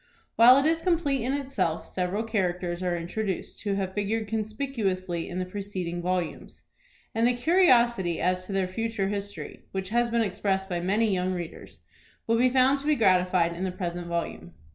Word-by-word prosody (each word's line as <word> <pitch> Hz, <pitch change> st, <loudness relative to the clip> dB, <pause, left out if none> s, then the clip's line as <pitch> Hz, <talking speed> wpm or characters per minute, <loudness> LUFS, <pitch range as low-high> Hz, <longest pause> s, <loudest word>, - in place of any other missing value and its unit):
While 245 Hz, +3 st, +8 dB
it 275 Hz, -, +2 dB
is 325 Hz, +1 st, +2 dB
complete 320 Hz, -7 st, +1 dB
in 260 Hz, +3 st, -1 dB
itself, 195 Hz, -, -1 dB
several 185 Hz, +4 st, -2 dB
characters 180 Hz, -5 st, -1 dB
are 180 Hz, -1 st, 0 dB
introduced 185 Hz, +3 st, -4 dB
who 205 Hz, -2 st, -1 dB
have 190 Hz, -1 st, -2 dB
figured 210 Hz, +2 st, -1 dB
conspicuously 215 Hz, -6 st, -2 dB
in 175 Hz, -, -5 dB
the 185 Hz, -, -1 dB
preceding 185 Hz, -3 st, -4 dB
volumes; 180 Hz, -2 st, -3 dB, 0.5 s
and 225 Hz, +1 st, +3 dB
the 250 Hz, -, +3 dB
curiosity 240 Hz, -, +3 dB
as 185 Hz, 0 st, 0 dB
to -, -, -6 dB
their 195 Hz, -1 st, 0 dB
future 205 Hz, 0 st, -2 dB
history, 205 Hz, 0 st, -6 dB
which 190 Hz, -1 st, -3 dB
has 240 Hz, +2 st, +2 dB
been 235 Hz, 0 st, +2 dB
expressed 195 Hz, -1 st, -1 dB
by 175 Hz, -3 st, -2 dB
many 205 Hz, +4 st, +1 dB
young 185 Hz, 0 st, 0 dB
readers, 175 Hz, -2 st, -8 dB, 0.4 s
will 230 Hz, 0 st, +2 dB
be 255 Hz, +1 st, +5 dB
found 260 Hz, +2 st, +3 dB
to 285 Hz, -, -7 dB
be 305 Hz, -, +4 dB
gratified 180 Hz, -6 st, +3 dB
in 175 Hz, +2 st, -5 dB
the 190 Hz, -, -1 dB
present 175 Hz, -2 st, -4 dB
volume. 85 Hz, -, -4 dB
195 Hz, 180 wpm, -27 LUFS, 180-230 Hz, 0.5 s, While